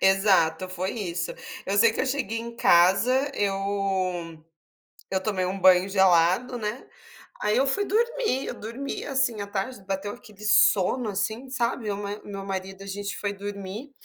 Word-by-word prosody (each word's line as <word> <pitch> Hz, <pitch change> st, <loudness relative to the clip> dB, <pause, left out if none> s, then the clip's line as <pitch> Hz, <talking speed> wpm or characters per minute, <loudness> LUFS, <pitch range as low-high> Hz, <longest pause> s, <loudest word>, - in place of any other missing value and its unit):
Exato, 190 Hz, -3 st, +3 dB
foi 185 Hz, +1 st, -3 dB
isso, 175 Hz, -6 st, -3 dB, 0.3 s
eu 195 Hz, -, 0 dB
sei 225 Hz, +1 st, +6 dB
que -, -, -2 dB
eu 265 Hz, -, 0 dB
cheguei 255 Hz, -5 st, -1 dB
em 235 Hz, 0 st, -7 dB
casa, 220 Hz, +12 st, +4 dB
eu 195 Hz, -4 st, -1 dB, 0.7 s
eu 190 Hz, 0 st, 0 dB
tomei 190 Hz, -4 st, 0 dB
um 190 Hz, +2 st, -2 dB
banho 185 Hz, 0 st, +6 dB
gelado, 190 Hz, +5 st, +3 dB
né, 215 Hz, +2 st, -4 dB, 0.6 s
aí 210 Hz, +1 st, +1 dB
eu 270 Hz, -, +3 dB
fui 405 Hz, +10 st, 0 dB
dormir, 455 Hz, -, 0 dB
eu -, -, -3 dB
dormi, 235 Hz, +6 st, -5 dB
assim, 265 Hz, -6 st, 0 dB
à 200 Hz, -, -5 dB
tarde, 200 Hz, +3 st, -4 dB
bateu 195 Hz, +1 st, -3 dB
aquele 210 Hz, -1 st, -14 dB
sono 210 Hz, +2 st, +3 dB
assim, 220 Hz, +6 st, -3 dB
sabe, 240 Hz, -2 st, -1 dB
meu 200 Hz, -1 st, -2 dB
ma 205 Hz, +1 st, -5 dB
meu 195 Hz, -1 st, -6 dB
marido, 195 Hz, 0 st, -5 dB
a -, -, -10 dB
gente 200 Hz, +1 st, -4 dB
foi 205 Hz, -1 st, -2 dB
dormir, 200 Hz, +6 st, -7 dB
200 Hz, 165 wpm, -26 LUFS, 190-235 Hz, 0.7 s, sei